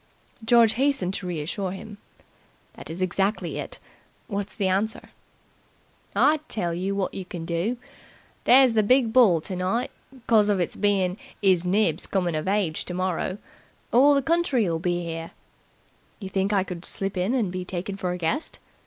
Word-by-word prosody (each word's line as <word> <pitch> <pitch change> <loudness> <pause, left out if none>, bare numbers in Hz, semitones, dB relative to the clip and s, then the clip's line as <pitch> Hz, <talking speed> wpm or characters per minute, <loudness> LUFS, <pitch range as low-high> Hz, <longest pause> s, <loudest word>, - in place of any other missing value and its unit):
George 230 -1 +5
hastened 260 -8 +1
to 185 - -4
reassure 175 +3 -3
him. 205 +1 -10 0.7
"That - - -11
is 170 +3 -3
exactly 195 +3 -1
it. - - -7 0.5
What's 200 -2 -4
the 195 - 0
answer?" 200 +4 -1 1.0
"I'll 305 +1 +4
tell 175 -6 -1
yer 190 +3 -2
wot 195 -2 -2
you 195 - -5
can 175 -2 -7
do. 175 +9 -1 0.7
There's 255 -1 +6
the 220 - +4
big 235 +1 +3
ball 210 -11 +5
tonight 185 +7 -2 0.3
'cos 215 -3 +4
of 200 -2 +2
its 175 - -2
bein' 195 -2 +1 0.3
'Is 185 -3 +3
Nibs' 180 -3 +1
comin' 180 -3 0
of 155 +2 -3
age 195 -5 0
tomorrow. 185 +1 -2 0.6
All 280 +4 +6
the 275 - +1
county'll 255 - +1
be 175 0 -1
'ere." 165 0 -5 0.9
"You 195 -4 -6
think 195 +1 0
I 195 -2 +2
could 180 -2 -7
slip 195 +1 -1
in 185 +7 0
and 215 -8 0
be 185 0 -4
taken 185 +2 -5
for 185 -2 -3
a 180 - -3
guest?" 180 - -2
195 Hz, 160 wpm, -25 LUFS, 180-220 Hz, 1.0 s, There's